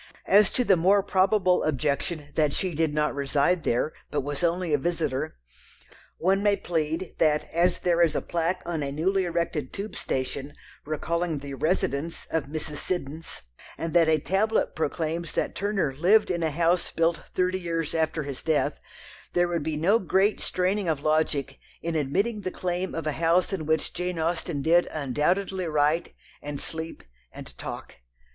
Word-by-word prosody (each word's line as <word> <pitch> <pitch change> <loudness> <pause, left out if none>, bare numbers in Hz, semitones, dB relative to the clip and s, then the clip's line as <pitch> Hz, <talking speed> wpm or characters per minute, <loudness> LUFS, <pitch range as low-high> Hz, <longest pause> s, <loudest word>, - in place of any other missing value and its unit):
As 205 +1 +6
to 250 - +2
the 195 - +5
more 190 +4 +4
probable 190 -1 +3
objection 150 +1 -1
that 150 -2 +2
she 185 -2 -1
did 160 0 +1
not 150 0 +1
"reside" 140 +5 +1
there, 125 +6 0 0.2
but 145 - -1
was 145 +3 -4
only 170 -1 +1
a 145 - +3
visitor, 155 -2 -1 0.8
one 195 +3 +2
may 205 0 +4
plead 165 -1 -2
that 150 -1 +3
as 175 +2 +3
there 175 -1 +2
is 165 -3 +3
a - - +1
plaque 170 +2 -1
on 170 -3 -2
a 140 -1 -2
newly 185 +6 +1
erected 170 -5 -2
tube 205 +2 -6
station 135 +2 -3 0.3
recalling 165 +2 -1
the 140 0 -7
"residence" 155 0 -1
of 160 -3 0
Mrs. 150 +1 -5
Siddons, 160 - -4 0.3
and 165 -1 -3
that 170 -2 +5
a 155 - +5
tablet 195 +8 +1
proclaims 160 +1 -2
that - - -1
Turner 200 -8 0
"lived" 185 +9 +4
in 170 -1 -1
a 160 - +1
house 170 +3 +1
built 165 0 +1
thirty 185 0 +1
years 165 -3 -2
after 160 -1 0
his 140 -2 -6
death, 160 -2 +1 0.5
there 175 0 +3
would 170 -2 -1
be 155 0 -2
no 195 +9 +4
great 195 +2 +2
straining 185 0 0
of 150 -3 0
logic 155 -2 0 0.2
in 170 - -1
admitting 200 - 0
the 185 - -2
claim 180 0 -3
of 165 -1 -3
a 155 - +1
house 170 +5 +2
in 160 -6 -3
which 160 -1 0
Jane 180 0 -3
Austen 160 -2 -1
did 170 +3 +4
undoubtedly 175 +7 0
write, 155 +2 +1 0.3
and 145 -1 -5
sleep, 160 0 -5 0.3
and - - -11
talk. - - -7
165 Hz, 170 wpm, -26 LUFS, 150-180 Hz, 0.8 s, As